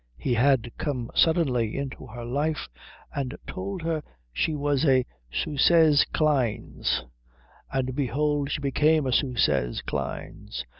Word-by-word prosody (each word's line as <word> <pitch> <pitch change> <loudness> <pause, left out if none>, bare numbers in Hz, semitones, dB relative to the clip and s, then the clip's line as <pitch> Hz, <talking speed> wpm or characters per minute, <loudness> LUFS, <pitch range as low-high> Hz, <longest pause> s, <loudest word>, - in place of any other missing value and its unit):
He 125 - -1
had 125 -1 +3
come 125 -6 -2
suddenly 130 -10 +2
into 135 -1 -5
her 120 0 -8
life 145 +6 -1 0.5
and 135 -1 -3
told 190 -1 -5
her 165 -2 -1 0.3
she 155 - 0
was 145 -1 0
a 130 -4 +4 0.3
süsses 155 - +4
Kleines: 140 -8 0 0.7
and 130 -1 -1
behold 145 +1 0
she 150 - -2
became 150 +2 +3
a 130 - 0
süsses 75 - +1
Kleines. 65 +2 -5
140 Hz, 120 wpm, -26 LUFS, 125-155 Hz, 0.7 s, a